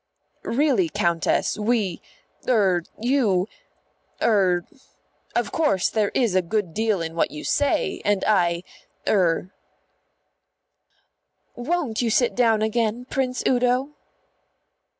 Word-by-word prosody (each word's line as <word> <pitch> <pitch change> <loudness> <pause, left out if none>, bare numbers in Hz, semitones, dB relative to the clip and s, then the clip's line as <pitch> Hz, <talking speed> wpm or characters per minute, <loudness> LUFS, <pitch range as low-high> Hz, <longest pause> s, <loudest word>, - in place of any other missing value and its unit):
"Really, 250 - +2
Countess, 170 +5 0
we 210 -5 0 0.5
er 195 -7 +3 0.2
you 220 -7 +1 0.7
er 185 -5 +2 0.7
Of - - 0
course 290 - +1
there 215 -2 +1
is 235 -7 +2
a 185 - +3
good 180 -1 -2
deal 215 -4 0
in 165 0 -5
what 165 - +1
you 150 - -8
say, 285 -1 0
and 205 -1 +1
I 175 -4 +2 0.4
er 185 -2 +1 1.0
" - - -47
"Won't 265 -3 -2
you 235 - 0
sit 240 +2 +2
down 225 -3 +2
again, 225 +2 -1
Prince 255 -2 -1
Udo?" 250 +2 +1
215 Hz, 110 wpm, -23 LUFS, 185-245 Hz, 1.0 s, er